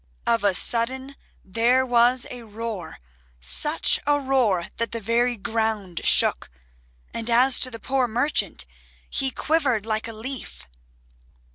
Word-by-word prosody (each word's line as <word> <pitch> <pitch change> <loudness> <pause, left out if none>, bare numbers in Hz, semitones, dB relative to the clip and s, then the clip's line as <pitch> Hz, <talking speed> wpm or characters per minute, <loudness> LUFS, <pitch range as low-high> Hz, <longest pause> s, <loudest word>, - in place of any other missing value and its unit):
Of 230 -2 +1
a 200 -2 +2
sudden 260 +6 0 0.3
there 235 +6 +2
was 245 0 +3
a 245 -1 -8
roar, 215 -5 -6 0.4
such - - +2
a 290 0 +3
roar 250 -10 +1
that 230 -1 -2
the 230 - -2
very 235 +3 0
ground 215 -5 -2
shook, - - +3 0.6
and 230 +1 -2
as 250 +2 +5
to 255 - -1
the 230 - -7
poor 260 +1 0
merchant 245 +6 0 0.5
he 270 -1 0
quivered 265 -7 0
like 220 0 -2
a 230 - -4
leaf. 220 - -7
230 Hz, 135 wpm, -23 LUFS, 220-260 Hz, 0.6 s, as